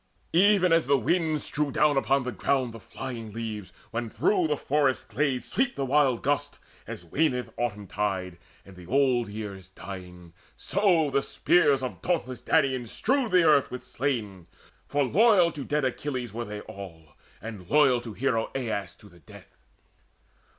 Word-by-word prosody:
Even 185 Hz, 0 st, +5 dB
as 165 Hz, -5 st, +3 dB
the 140 Hz, 0 st, +4 dB
winds 155 Hz, +3 st, 0 dB
strew 150 Hz, -1 st, -1 dB
down 150 Hz, +2 st, +3 dB
upon 135 Hz, 0 st, +2 dB
the 125 Hz, -, -3 dB
ground 130 Hz, -2 st, 0 dB
The 115 Hz, -, -9 dB
flying 115 Hz, -4 st, -7 dB
leaves, 110 Hz, -3 st, -5 dB, 0.2 s
when 120 Hz, 0 st, -3 dB
through 180 Hz, -, +1 dB
the 150 Hz, -1 st, 0 dB
forest 140 Hz, -2 st, 0 dB
glades 135 Hz, -3 st, -1 dB
Sweep 255 Hz, 0 st, +1 dB
the 135 Hz, -, -2 dB
wild 135 Hz, -3 st, +2 dB
gusts, 145 Hz, +1 st, -1 dB, 0.3 s
as 85 Hz, -, -7 dB
waneth 125 Hz, -, 0 dB
autumn 105 Hz, -4 st, -3 dB
tide, 95 Hz, -3 st, -3 dB, 0.3 s
And 95 Hz, -, -14 dB
the 90 Hz, -1 st, -13 dB
old 125 Hz, -3 st, +2 dB
year 105 Hz, -1 st, -5 dB
is 95 Hz, -1 st, -12 dB
dying; 90 Hz, -3 st, -10 dB, 0.2 s
so 180 Hz, -7 st, +2 dB
the 140 Hz, -, +2 dB
spears 145 Hz, -3 st, +2 dB
Of 130 Hz, -, -5 dB
dauntless 130 Hz, -9 st, -2 dB
Danaans 130 Hz, -5 st, +1 dB
strewed 260 Hz, -, 0 dB
the 180 Hz, -1 st, +5 dB
earth 150 Hz, -4 st, +4 dB
with 125 Hz, 0 st, -7 dB
slain, 115 Hz, -9 st, -3 dB, 0.4 s
For 145 Hz, 0 st, +1 dB
loyal 180 Hz, -, +4 dB
to 145 Hz, -, -6 dB
dead 150 Hz, 0 st, 0 dB
Achilles 130 Hz, -3 st, -3 dB
were 120 Hz, +1 st, -4 dB
they 105 Hz, -1 st, -6 dB
all, 85 Hz, -8 st, -11 dB, 0.2 s
And 100 Hz, -4 st, -9 dB
loyal 135 Hz, -5 st, +4 dB
to 115 Hz, -3 st, -8 dB
hero 115 Hz, -1 st, 0 dB
Aias 110 Hz, -8 st, -3 dB
to 105 Hz, -, -17 dB
the 90 Hz, -3 st, -18 dB
death. 75 Hz, -, -16 dB
130 Hz, 170 wpm, -27 LUFS, 105-150 Hz, 0.4 s, Even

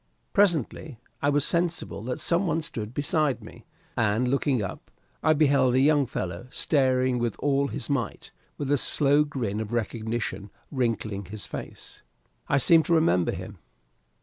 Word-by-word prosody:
Presently, 160 Hz, -, +1 dB, 0.2 s
I 145 Hz, -, +2 dB
was 145 Hz, -1 st, +2 dB
sensible 170 Hz, -, -1 dB
that 125 Hz, 0 st, -3 dB
some 175 Hz, +3 st, +1 dB
one 165 Hz, -1 st, 0 dB
stood 110 Hz, -8 st, -4 dB
beside 145 Hz, -2 st, 0 dB
me, 110 Hz, -, -13 dB, 0.3 s
and 115 Hz, +1 st, +1 dB
looking 135 Hz, 0 st, +1 dB
up, 95 Hz, -, -7 dB, 0.3 s
I 155 Hz, -, +4 dB
beheld 140 Hz, -4 st, +3 dB
a -, -, +4 dB
young 145 Hz, -1 st, +4 dB
fellow 90 Hz, -1 st, -5 dB
staring 130 Hz, -3 st, +1 dB
with 120 Hz, -3 st, -1 dB
all 140 Hz, -1 st, +1 dB
his -, -, -4 dB
might, 130 Hz, -7 st, -3 dB, 0.3 s
with 140 Hz, -1 st, -3 dB
a 145 Hz, -, +3 dB
slow 145 Hz, +2 st, +3 dB
grin 120 Hz, -8 st, -3 dB
of 110 Hz, 0 st, -4 dB
recognition 110 Hz, -3 st, -3 dB, 0.2 s
wrinkling 115 Hz, -6 st, -2 dB
his 100 Hz, +3 st, -7 dB
face. -, -, -9 dB, 0.5 s
I 140 Hz, -, +3 dB
seemed 160 Hz, +3 st, +5 dB
to 170 Hz, -, +3 dB
remember 125 Hz, -, +3 dB
him. -, -, -8 dB
130 Hz, 155 wpm, -26 LUFS, 115-150 Hz, 0.5 s, seemed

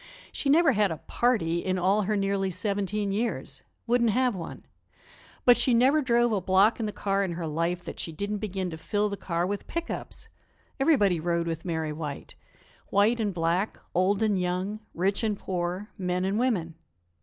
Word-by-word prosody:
She 280 Hz, -, -2 dB
never 315 Hz, +1 st, +6 dB
had 210 Hz, -4 st, +2 dB
a 160 Hz, -, -3 dB
"party" 175 Hz, -6 st, 0 dB
in 185 Hz, +1 st, -1 dB
all 190 Hz, +4 st, +3 dB
her 210 Hz, +1 st, 0 dB
nearly 195 Hz, -1 st, 0 dB
seventeen 200 Hz, +1 st, -1 dB
years 225 Hz, +4 st, -2 dB, 0.2 s
wouldn't 235 Hz, -1 st, +3 dB
have 250 Hz, +1 st, +2 dB
one; 170 Hz, -3 st, -7 dB, 0.8 s
but 245 Hz, -1 st, +7 dB
she 240 Hz, 0 st, +3 dB
never 270 Hz, +6 st, +4 dB
drove 240 Hz, -2 st, +3 dB
a 205 Hz, -3 st, +1 dB
block 190 Hz, +5 st, +4 dB
in 220 Hz, -, -1 dB
the -, -, -3 dB
car 200 Hz, -1 st, 0 dB
in 180 Hz, -3 st, -2 dB
her 170 Hz, 0 st, -4 dB
life 170 Hz, +3 st, -1 dB
that 170 Hz, -, -8 dB
she 165 Hz, -, -3 dB
didn't 200 Hz, +6 st, -3 dB
begin 190 Hz, -3 st, -3 dB
to 160 Hz, -, -7 dB
fill 205 Hz, +5 st, 0 dB
the 200 Hz, -, -3 dB
car 170 Hz, -3 st, -2 dB
with 200 Hz, +2 st, -4 dB
pick 335 Hz, 0 st, -3 dB
ups! -, -, -6 dB, 0.5 s
Everybody 210 Hz, -, +3 dB
rode 170 Hz, +1 st, 0 dB
with 165 Hz, 0 st, -4 dB
Mary 160 Hz, -3 st, -2 dB
White 150 Hz, -2 st, -6 dB, 0.6 s
white 215 Hz, +4 st, +3 dB
and 210 Hz, -2 st, 0 dB
black, 175 Hz, +3 st, 0 dB, 0.2 s
old 195 Hz, +4 st, +2 dB
and 205 Hz, -4 st, +2 dB
young, 185 Hz, +4 st, -2 dB, 0.2 s
rich 195 Hz, +5 st, 0 dB
and 215 Hz, -2 st, 0 dB
poor, 180 Hz, +2 st, -3 dB
men 180 Hz, 0 st, -1 dB
and 195 Hz, +3 st, 0 dB
women. 200 Hz, -10 st, 0 dB
195 Hz, 190 wpm, -27 LUFS, 175-220 Hz, 0.8 s, but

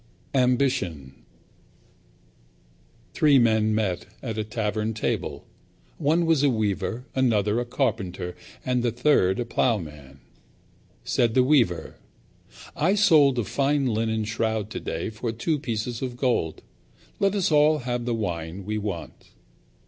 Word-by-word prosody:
Ambition 125 Hz, -, +1 dB, 2.0 s
Three 150 Hz, -3 st, +5 dB
men 110 Hz, -3 st, +3 dB
met 95 Hz, -5 st, -1 dB, 0.2 s
at 115 Hz, -4 st, -3 dB
a -, -, 0 dB
tavern 110 Hz, 0 st, -2 dB
table. 110 Hz, -, -3 dB, 0.5 s
One 165 Hz, +4 st, +2 dB
was 165 Hz, -4 st, +3 dB
a 145 Hz, -, +4 dB
weaver, 110 Hz, +1 st, -1 dB
another 110 Hz, -4 st, +2 dB
a 120 Hz, -, -2 dB
carpenter 110 Hz, -9 st, -2 dB, 0.3 s
and 125 Hz, -1 st, +1 dB
the 120 Hz, -, +1 dB
third 120 Hz, -6 st, +2 dB
a 120 Hz, -, -1 dB
ploughman. 75 Hz, -, -2 dB, 0.9 s
Said 115 Hz, -2 st, +1 dB
the 130 Hz, -, +5 dB
weaver, 125 Hz, -, +1 dB, 0.8 s
"I 185 Hz, +7 st, +2 dB
sold 150 Hz, -10 st, +5 dB
a 120 Hz, -, +1 dB
fine 140 Hz, +7 st, 0 dB
linen 110 Hz, 0 st, 0 dB
shroud 110 Hz, -1 st, -2 dB
today -, -, -4 dB
for 110 Hz, +2 st, -4 dB
two 145 Hz, +7 st, -1 dB
pieces 115 Hz, -2 st, -3 dB
of 125 Hz, -2 st, -4 dB
gold. 120 Hz, -, -1 dB, 0.6 s
Let 200 Hz, 0 st, +2 dB
us 195 Hz, -3 st, +1 dB
have -, -, 0 dB
all 150 Hz, -1 st, +4 dB, 0.2 s
the 120 Hz, -1 st, -2 dB
wine 90 Hz, -3 st, -4 dB
we 105 Hz, +1 st, -2 dB
want." 85 Hz, -8 st, -6 dB
115 Hz, 130 wpm, -25 LUFS, 105-130 Hz, 2.0 s, Three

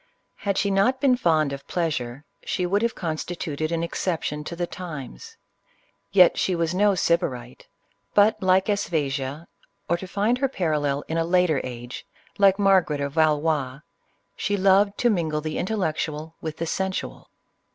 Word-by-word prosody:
Had 200 Hz, -2 st, -2 dB
she 200 Hz, -, +1 dB
not 230 Hz, +7 st, +2 dB
been 265 Hz, -2 st, +4 dB
fond 155 Hz, -, +2 dB
of 140 Hz, 0 st, -8 dB
pleasure, 145 Hz, -6 st, -2 dB, 0.2 s
she 180 Hz, -, -1 dB
would 200 Hz, +4 st, +1 dB
have 235 Hz, +1 st, 0 dB
constituted 155 Hz, -2 st, -3 dB
an 165 Hz, 0 st, -1 dB
exception 165 Hz, -3 st, -2 dB
to 170 Hz, -, -5 dB
the 175 Hz, +1 st, -1 dB
times. 150 Hz, -, -8 dB, 0.7 s
Yet 185 Hz, -3 st, +6 dB
she 185 Hz, -, +1 dB
was 170 Hz, 0 st, 0 dB
no 200 Hz, +1 st, +3 dB
Sybarite; 125 Hz, -9 st, -1 dB, 0.5 s
but, 210 Hz, +2 st, +4 dB
like 185 Hz, 0 st, +3 dB
Aspasia, 155 Hz, -7 st, -2 dB, 0.2 s
— -, -, -48 dB
or, 170 Hz, -, +1 dB
to 190 Hz, -, -8 dB
find 210 Hz, +6 st, 0 dB
her 275 Hz, -, +2 dB
par 185 Hz, -11 st, -2 dB
allel 145 Hz, -2 st, 0 dB
in 165 Hz, +1 st, -1 dB
a -, -, +2 dB
later 175 Hz, -3 st, +2 dB
age, 120 Hz, -1 st, -7 dB, 0.4 s
like 195 Hz, -1 st, +5 dB
Margaret 190 Hz, -7 st, +3 dB
of 140 Hz, 0 st, -3 dB
Valois, 150 Hz, -4 st, +1 dB, 0.3 s
— 100 Hz, 0 st, -45 dB
she 205 Hz, 0 st, -1 dB
loved 200 Hz, +1 st, +4 dB
to 240 Hz, -, +3 dB
mingle 160 Hz, -6 st, 0 dB
the 155 Hz, 0 st, -4 dB
intellectual 160 Hz, -5 st, -2 dB
with 160 Hz, -1 st, -5 dB
the 165 Hz, -, -2 dB
sensual. 190 Hz, +3 st, -3 dB
170 Hz, 165 wpm, -24 LUFS, 150-195 Hz, 0.7 s, Yet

